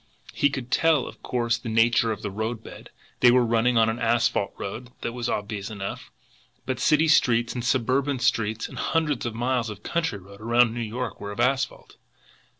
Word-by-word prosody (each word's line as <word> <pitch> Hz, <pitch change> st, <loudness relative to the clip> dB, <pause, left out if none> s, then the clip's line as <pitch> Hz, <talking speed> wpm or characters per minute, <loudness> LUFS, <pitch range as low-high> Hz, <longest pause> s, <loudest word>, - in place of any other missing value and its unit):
He 145 Hz, -, +3 dB
could 130 Hz, -3 st, -6 dB
tell, 160 Hz, -4 st, +3 dB
of -, -, -11 dB
course, 120 Hz, -2 st, -1 dB
the 115 Hz, -, -6 dB
nature 115 Hz, 0 st, +3 dB
of 105 Hz, -, -5 dB
the 105 Hz, -, -3 dB
roadbed. 110 Hz, +3 st, -5 dB, 0.3 s
They 125 Hz, -, +7 dB
were 125 Hz, 0 st, +4 dB
running 115 Hz, +1 st, +2 dB
on 110 Hz, -1 st, +5 dB
an 110 Hz, +2 st, -1 dB
asphalt 115 Hz, -3 st, +1 dB
road, 110 Hz, +5 st, -6 dB
that 115 Hz, -, -3 dB
was 120 Hz, -1 st, -3 dB
obvious 105 Hz, -1 st, -3 dB
enough; 100 Hz, -3 st, -6 dB, 0.6 s
but 130 Hz, -2 st, -2 dB
city 155 Hz, +4 st, +3 dB
streets 120 Hz, -6 st, +3 dB
and 120 Hz, -, -4 dB
suburban 130 Hz, +3 st, +1 dB
streets 115 Hz, -3 st, 0 dB
and -, -, -9 dB
hundreds 150 Hz, -7 st, 0 dB
of 115 Hz, -, -5 dB
miles 120 Hz, -1 st, 0 dB
of 105 Hz, -1 st, -9 dB
country 165 Hz, -10 st, -1 dB
road 100 Hz, +2 st, -14 dB
around 120 Hz, +1 st, +3 dB
New 120 Hz, -, -4 dB
York 115 Hz, 0 st, -4 dB
were 100 Hz, 0 st, -5 dB
of 100 Hz, -, -8 dB
asphalt! 130 Hz, +1 st, -1 dB
120 Hz, 190 wpm, -25 LUFS, 110-125 Hz, 0.6 s, They